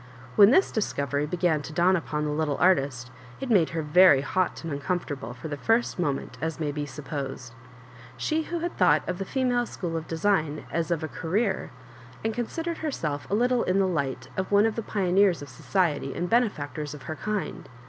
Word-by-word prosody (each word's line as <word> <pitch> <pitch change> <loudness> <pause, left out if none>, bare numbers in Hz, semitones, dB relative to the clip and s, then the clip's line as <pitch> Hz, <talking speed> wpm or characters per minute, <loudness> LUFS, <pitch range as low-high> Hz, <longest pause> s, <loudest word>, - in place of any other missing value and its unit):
When 200 0 +8
this 375 +10 +4
discovery 145 - -1
began 170 -2 +1
to 145 - -8
dawn 180 +3 +4
upon 150 -3 -2
the 150 - -1
little 150 -1 0
artist, 135 -8 +2 0.3
it 265 -2 -3
made 180 -7 +4
her 165 -1 -3
very 150 -2 +6
hot 185 +6 -1
and 165 -3 -4
uncom 175 +6 -1
fortable 130 -7 -7
for 130 +6 -7
the 145 -2 -4
first 225 +5 +1
moment, 135 -5 -2
as 160 -1 -3
may 150 -2 -1
be 145 0 -4
supposed. 135 -2 -6 0.6
She 315 +1 0
who 340 +1 -4
had 345 +1 -3
thou^^ht - - +4
of 180 0 -3
the 195 - -2
Female 245 0 0
School 170 -3 -4
of 160 -1 -4
Design 160 -3 0
as 170 0 -1
of 170 -2 -1
a - - -1
Career, 190 +6 -1 0.6
and 225 - +1
considered 325 +9 -3
herself 155 - -3
a 200 - +1
little 245 +2 +2
in 185 - +1
the 195 - +3
light 145 -8 -2
of 190 +1 -3
one 205 +1 +5
of 225 - 0
the 230 - -2
pioneers 190 -4 +2
of 145 - -10
society 145 0 -1
and 175 - -2
bene&ctors 150 -10 0
of 145 - -11
her 155 - -5
kind 210 +3 -4
170 Hz, 200 wpm, -26 LUFS, 145-205 Hz, 0.6 s, When